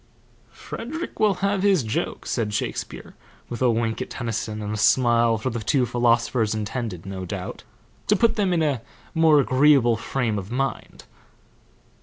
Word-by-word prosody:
'" - - -34
"Frederick 315 +10 -7
will 210 -3 +3
have 200 -1 +1
his 195 -7 +3
joke," 110 - -3
said 110 -3 -1
Shakespeare, - - -4 0.4
with 120 - -6
a 125 - +4
wink 115 0 -1
at - - -4
Tennyson 115 -2 -4
and 105 0 -4
a - - -3
smile 115 0 +3
for 130 +4 -3
the 120 - -3
two 125 +5 +1
philosophers, 120 -2 +1
intended, 110 -4 -4
no 95 -1 -6
doubt, 90 - -6 0.4
to 210 - +4
put 230 +3 +2
them 200 -3 +1
in 170 -2 +2
a 140 -6 0 0.3
more 160 -3 +5
agreeable 130 -3 +4
frame 115 -2 -2
of 95 0 -8
mind. 135 +3 -3
120 Hz, 165 wpm, -23 LUFS, 110-150 Hz, 0.4 s, more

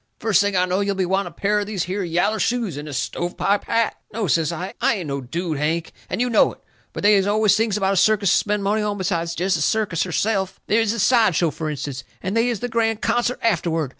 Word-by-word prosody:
First 215 -3 +2
thing 205 -1 0
I 180 - +3
know 185 +1 0
you'll 200 0 0
be 190 -1 0
wanting 190 0 0
a 170 - -20
pair 210 +3 +1
of 205 - -3
these 200 -5 -2
here 190 +3 -3
yaller 175 +5 0
shoes 230 - -1
and 145 +1 -7
a - - -6
stove 135 - -3
pipe 200 +1 +1
hat." 230 -1 0
"No," 220 0 -2
says 165 -1 +1
I, 180 +3 -5
"I - - +3
ain't 180 -6 -5
no 140 0 -3
dude, 160 +4 -3
Hank, 160 +3 -1 0.2
and - - -3
you 250 - +2
know 235 -3 +3
it. - - -21 0.3
But - - -7
they 210 +1 +6
is 195 -1 +3
always 210 0 +3
things 220 -1 +1
about 195 -1 +1
a - - -1
circus 205 0 +3
to - - +5
spend 210 -1 -1
money 210 +2 +1
on 210 -1 -2
besides 170 -3 -2
jest 185 +2 +1
the - - -4
circus 195 -1 0
herself. 190 +1 -1
They 210 - +2
is 225 -2 +1
the 230 - -3
side 220 -3 +3
show, 165 -1 +2
fur 155 +2 -4
instance, 140 -2 -5 0.2
and 190 +4 -3
they 230 +2 +2
is 230 -5 -3
the 245 - -1
grand 225 -2 0
concert 240 +1 +1
afterward. 165 - 0
195 Hz, 265 wpm, -22 LUFS, 170-215 Hz, 0.3 s, they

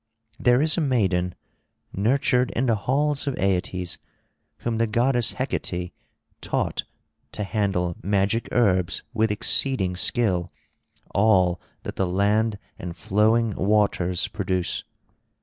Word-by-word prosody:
There 125 +3 +4
is 160 +2 +2
a - - +1
maiden, 95 - +1 0.6
nurtured 125 +4 +2
in 125 - +1
the 120 - +3 0.2
halls 145 +1 +1
of 140 - 0
Aeetes, 90 -2 -1 0.6
whom 115 -1 -2
the 115 - +2
goddess 120 +2 +2
Hecate 90 -9 -3 0.5
taught - - -2 0.5
to 105 - -3
handle 95 -4 -1
magic 100 +4 0
herbs 95 -7 +2
with 110 -1 +2
exceeding 105 -2 +1
skill 90 -3 +1 0.6
all 95 -4 +3 0.2
that - - -6
the 95 - +1
land 105 +4 +1 0.2
and 85 0 -6
flowing 110 +5 +2
waters 95 -3 +1
produce. 95 -2 -2
105 Hz, 115 wpm, -24 LUFS, 90-120 Hz, 0.6 s, There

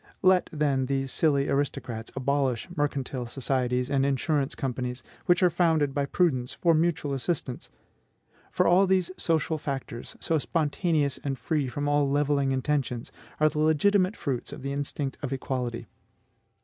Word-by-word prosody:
Let, 185 -1 +4
then, 140 -4 +1
these 135 -1 -1
silly 140 -3 +2
aristocrats 125 -5 -2
abolish 135 -1 0
mercantile 135 -4 -2
societies 125 -1 0
and 135 -1 +2
insurance 140 +1 0
companies, 125 -2 -3 0.2
which 175 0 +4
are 180 - +5
founded 160 -5 +2
by 140 0 0
prudence 135 -8 +1
for 170 -2 +3
mutual 155 -3 +1
assistance. 135 -2 -3 0.8
For - - +2
all 190 +3 +5
these 185 -1 +2
social 160 -1 0
facts, 135 -5 -5
so 160 -1 +1
spontaneous 155 -2 0
and 135 -2 -2
free 150 -2 -1
from 145 +4 -3
all 145 -1 +2
levelling 140 -1 +1
intentions, 130 -3 -1 0.3
are 155 - +5
the 150 - -2
legitimate 185 +6 +3
fruits 135 -7 -3
of - - -8
the 140 0 -2
instinct 140 -1 -3
of 140 -3 -4
equality. 125 -3 -3
140 Hz, 150 wpm, -27 LUFS, 130-160 Hz, 0.8 s, are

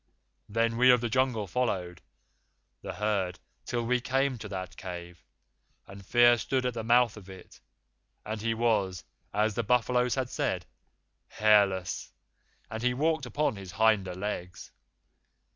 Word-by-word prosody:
Then 115 +2 0
we 125 +1 +6
of 125 -1 +7
the 120 0 -2
Jungle 130 -4 +1
followed 90 -5 -2 0.8
the - - -6
herd 100 -4 -1 0.3
till 120 -1 -1
we 125 +1 +1
came 135 0 0
to 105 - -7
that 95 -2 -6
cave, 90 -2 -8 0.6
and 100 0 -12
Fear 120 +3 +5
stood 130 +1 -1
at 125 - 0
the 115 -1 -4
mouth 120 -1 +3
of 95 -2 -12
it, 95 -1 -13 0.7
and 110 +1 -4
he 115 0 0
was, 100 -7 0 0.3
as 105 +1 +1
the 120 - -1
buffaloes 125 0 +2
had 130 -2 -2
said, - - -1 0.6
hairless, 100 -4 +2 0.6
and 110 0 -6
he 125 0 +1
walked 155 -1 0
upon 135 -2 -1
his 95 -3 -9
hinder 100 -3 +2
legs. 90 -2 -5
110 Hz, 145 wpm, -29 LUFS, 95-125 Hz, 0.8 s, of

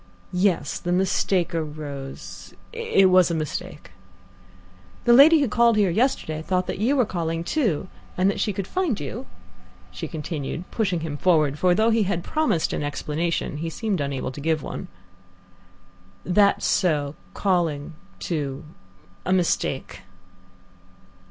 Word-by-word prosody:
"Yes, 180 0 +1
the 175 - -3
mistake 185 -1 +1
arose 150 -4 -6 0.2
it 460 - +3
was 185 -1 +6
a 170 - -1
mistake." 155 -2 -5 1.1
"The 240 - +6
lady 300 +5 +8
who 280 - +2
called 235 0 +3
here 200 -4 +3
yesterday 195 - 0
thought 180 +2 0
that - - -4
you 245 +7 +2
were 255 -4 +3
calling 165 -3 -2
too, 195 - 0 0.3
and 185 +1 +3
that 200 - 0
she 210 - +1
could 195 -1 -4
find 355 - -1
you?" 205 - -6 0.6
she - - -6
continued, 155 0 -4
pushing 195 -7 0
him 155 -2 -4
forward, 150 -4 +2
for, 180 -1 +4
though 220 +3 +3
he 225 0 +3
had 185 -4 -1
promised 305 - 0
an - - -2
explanation, 150 +2 -2
he 165 +2 -3
seemed 200 -1 -2
unable 140 -2 -3
to 145 - -8
give 160 0 0
one. - - -6 1.4
"That's 200 +2 +3
so, 150 -6 +1 0.2
calling 170 -6 0 0.2
too 140 - -3 0.6
a 185 - -2
mistake." 170 - 0
175 Hz, 140 wpm, -24 LUFS, 155-205 Hz, 1.4 s, lady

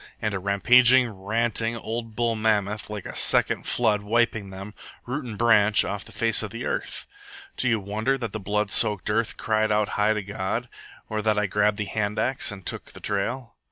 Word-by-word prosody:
And 105 -2 -2
a 100 - -2
rampaging, 120 +6 +5
ranting, 115 +3 -1
old 115 0 -5
bull 115 -1 0
mammoth, 105 -1 0
like 105 -2 -6
a - - -7
second - - +2
flood, 110 -4 +2
wiping 110 -1 0
them, 95 +2 -9 0.3
root 135 +5 -3
and 110 -4 -7
branch, 110 -3 +4
off 100 0 -4
the - - -13
face 115 -1 +1
of 110 - -4
the 115 +4 -6
earth! - - -3 0.5
Do 130 - 0
you 115 -2 +2
wonder 110 +7 -1
that 115 -5 -4
the 110 - -3
blood 105 +1 -1
soaked 105 -2 +2
earth 115 +1 -1
cried 110 0 0
out 105 0 +2
to - - -10
high 105 +1 +1
God? 100 +4 -4 0.4
Or 110 -1 -2
that 105 0 +1
I 105 - +2
grabbed 105 +1 +1
the 105 - -2
hand 105 0 -2
axe 130 -3 0
and 95 -2 -10
took - - -4
the - - -11
trail?" 110 +3 -3
110 Hz, 200 wpm, -25 LUFS, 105-115 Hz, 0.5 s, rampaging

